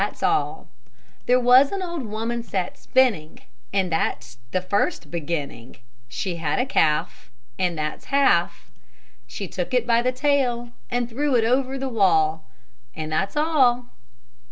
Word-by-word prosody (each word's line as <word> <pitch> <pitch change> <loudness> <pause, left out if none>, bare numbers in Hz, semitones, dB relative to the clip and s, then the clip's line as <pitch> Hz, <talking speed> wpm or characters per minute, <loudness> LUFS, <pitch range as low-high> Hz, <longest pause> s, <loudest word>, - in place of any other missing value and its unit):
THAT'S - - -3
ALL 405 - 0 0.6
There 250 +1 +5
was 250 +3 +6
an 390 -1 -3
old 340 -3 -4
woman 225 +3 -3
sat 190 -5 -3
spinning, 225 -13 +1 0.3
And 190 -3 0
that's 115 -7 -2
the 185 - 0
first 200 - -1
beginning; 145 -7 -5 0.3
She 175 - -4
had 160 -3 -1
a 250 - +1
calf, 150 - 0 0.3
And 180 -3 0
that's 150 0 -4
half; 170 - +1 0.6
She - - -6
took 180 +7 -3
it 250 - +2
by 235 -1 +3
the 250 +1 +1
tail, 255 -3 0 0.2
And 245 -1 -1
threw 275 +3 -1
it 230 - +3
over 260 +3 +1
the 270 0 -3
wall, 160 - +2 0.5
And 155 0 -5
that's 195 - -1
all! 260 -6 +2
230 Hz, 150 wpm, -23 LUFS, 165-255 Hz, 0.6 s, was